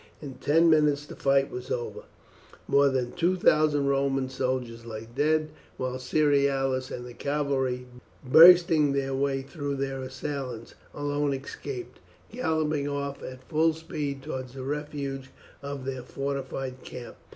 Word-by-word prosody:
In 140 -3 -7
ten 160 +6 +3
minutes 150 -2 +3
the - - -10
fight 135 0 +2
was 125 +1 -6
over, 120 -1 -4 0.6
more 140 0 +5
than 125 -2 -1
two 180 +2 +1
thousand 150 -4 +3
Roman 135 -1 +1
soldiers 125 -3 -2
lay 110 -1 -7
dead, 155 +2 +2 0.3
while 130 0 -3
Cerealis 135 -2 +1
and 125 - -6
the 125 - -9
cavalry, 135 -2 -1 0.4
bursting 165 0 +7
their 135 -1 -1
way 135 0 0
through 140 0 -4
their 135 -1 -3
assailants, 130 -3 -5 0.2
alone 145 -1 0
escaped, 365 - -7 0.3
galloping 155 - 0
off 140 -1 -3
at 130 0 -8
full 160 0 +3
speed 145 -4 -5
towards 130 -3 -6
the 130 - -6
refuge 140 -1 -4 0.3
of 140 -2 -6
their 130 -1 -3
fortified 135 -1 -4
camp. 125 -1 -9
140 Hz, 140 wpm, -27 LUFS, 130-150 Hz, 0.6 s, bursting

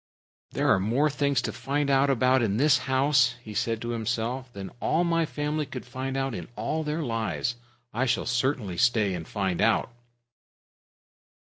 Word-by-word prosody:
"There - - 0
are - - +5
more 125 +10 +1
things 140 -2 +1
to - - -2
find 145 +1 -1
out 140 0 +3
about 130 0 +3
in 105 -3 0
this 145 +1 +4
house," 130 -2 +3
he 110 - -8
said 115 +1 -1
to 120 - -4
himself, 120 +2 -2
"than 100 -3 -7
all 165 +3 +1
my 165 -2 +1
family 150 0 -2
could 130 -2 -7
find 130 +2 -4
out 135 -1 -1
in 90 -6 -6
all 115 +9 -2
their 150 +2 -2
lives. 115 0 -2 0.4
I 130 +4 0
shall 125 - +1
certainly 125 -6 -1
stay 110 -4 +3
and 85 -3 -5
find 95 -4 -1
out." - - +2
125 Hz, 170 wpm, -27 LUFS, 115-140 Hz, 0.4 s, are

